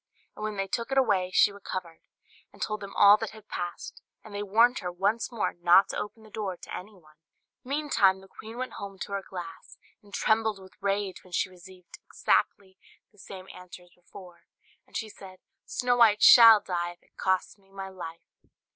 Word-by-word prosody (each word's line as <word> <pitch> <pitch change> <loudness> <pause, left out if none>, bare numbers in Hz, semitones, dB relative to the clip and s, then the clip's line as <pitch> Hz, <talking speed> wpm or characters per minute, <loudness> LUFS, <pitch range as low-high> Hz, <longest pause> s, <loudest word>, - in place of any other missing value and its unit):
And - - -11
when 215 -1 -4
they 195 - -1
took 235 +6 -3
it 270 - 0
away, 200 -8 +2
she 205 - +5
recovered, 185 -4 -7 0.5
and - - -19
told 215 0 -3
them 200 0 -9
all 205 +1 +7
that 225 -1 -4
had 215 - -16
passed; 175 -1 -6 0.2
and 215 - -13
they 205 - -4
warned 230 +5 +3
her 180 -2 -4
once 205 +7 -1
more 230 -3 -2
not 175 +3 +4
to - - -4
open 215 +1 -7
the 215 - -17
door 200 -4 -4
to - - -9
anyone. 180 -6 -12 0.5
Meantime 260 -9 +2
the 190 - -16
queen 225 +4 -11
went 255 0 -5
home 200 -1 -8
to 195 - -7
her 200 0 -2
glass, 175 -4 -10 0.2
and 205 -2 -20
trembled 220 0 +1
with 190 -1 -15
rage 200 -1 -2
when 185 - -18
she - - 0
received 185 0 -15
exactly 190 -1 -1 0.3
the 205 - -24
same 190 -1 -10
answer 180 0 -12
as 175 - -23
before; 180 0 -15 0.4
and - - -6
she 220 - -4
said 190 -3 -13 0.3
"Snow 245 -1 0
White 215 -3 +5
shall 230 -3 +10
die, 175 -1 -3
if 175 - -30
it - - -33
costs 190 +2 -1
me 195 0 -28
my 195 0 -8
life." 170 -3 -9
195 Hz, 200 wpm, -27 LUFS, 185-215 Hz, 0.5 s, shall